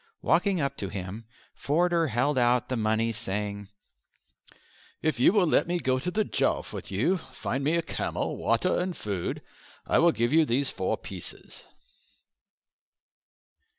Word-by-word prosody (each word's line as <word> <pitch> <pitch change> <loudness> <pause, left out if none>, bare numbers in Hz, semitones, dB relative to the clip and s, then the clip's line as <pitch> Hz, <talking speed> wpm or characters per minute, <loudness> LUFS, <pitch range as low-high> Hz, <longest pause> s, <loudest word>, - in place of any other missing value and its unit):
Walking 180 +2 +2
up 140 -2 -1
to 100 - -4
him 100 +3 -6 0.3
Forder 170 +2 +1
held 130 +4 +1
out 125 -1 +2
the 130 - -1
money 110 0 +1
saying, 105 -2 -4 1.4
"If 155 -5 0
you 125 - +6
will 200 -3 +3
let 155 - +3
me 175 +1 0
go 130 -6 0
to 180 - -2
the 210 +3 0
Jowf - - 0
with - - -7
you, 125 - +1
find 140 -4 -4
me 160 +4 +2
camel, 160 - -3
water 115 +11 +1
and 180 0 -2
food, 100 -4 -4 0.4
I - - +3
will 170 0 +5
give 120 -1 0
you 160 0 +6
these 135 0 +1
four - - -1
pieces." - - -7
130 Hz, 150 wpm, -27 LUFS, 115-170 Hz, 1.4 s, you